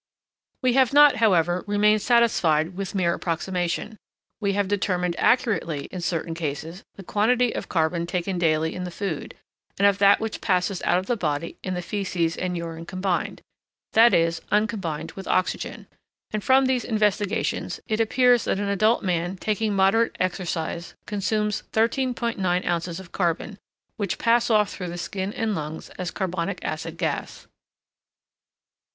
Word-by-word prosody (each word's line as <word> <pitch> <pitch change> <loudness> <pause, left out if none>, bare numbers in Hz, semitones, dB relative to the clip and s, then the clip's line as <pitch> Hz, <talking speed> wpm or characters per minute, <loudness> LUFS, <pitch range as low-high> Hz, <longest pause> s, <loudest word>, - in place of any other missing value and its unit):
We 255 -1 +3
have 260 0 +3
not, 295 0 +7
however, 180 -5 +3
remained 210 +1 +3
satisfied 180 -9 +2
with 195 +1 -5
mere 175 -3 +2
approximation: 180 +5 -2 0.4
we 200 -2 0
have 200 -1 0
determined 180 -3 0
accurately, 200 - +1
in 180 - -5
certain 165 -1 -2
cases, 165 +2 -5
the 195 - -10
quantity 235 +5 +2
of - - -5
carbon 170 0 0
taken 180 +1 -2
daily 160 -1 +1
in 180 - -5
the 180 - -4
food, 175 -3 -5 0.4
and 200 - +3
of 200 0 +2
that 200 0 +6
which 220 -1 -4
passes 185 -1 0
out 175 - +3
of 185 - -2
the 240 - 0
body 155 -5 -3
in 185 -1 -3
the 180 - -4
faeces 170 -3 -1
and 180 -1 -2
urine 165 0 -6
combined 185 -1 -2 0.5
that 230 +2 +7
is, 165 0 +2
uncombined 205 -7 -1
with 195 - -9
oxygen; 185 - -1 0.5
and 215 -1 -3
from 265 +1 +5
these 255 -2 +1
investigations 210 -3 0
it 215 0 -1
appears 245 +1 +3
that - - 0
an 200 0 -2
adult 215 +4 +2
man 175 0 -1
taking 215 +1 -1
moderate 195 +4 +3
exercise 170 -2 -3
consumes 210 +1 -1
13.9 230 -6 0
ounces 170 0 -2
of 185 -3 -12
carbon, 185 +3 -2 0.4
which 205 -1 -2
pass 235 +1 +2
off 210 -2 +3
through 180 -2 -5
the 175 - -6
skin 190 +3 -3
and 220 0 -1
lungs 155 -2 -5
as 180 -1 -2
carbonic 185 -1 -2
acid 160 +1 -4
gas. 160 -4 -3
190 Hz, 155 wpm, -24 LUFS, 170-215 Hz, 0.5 s, not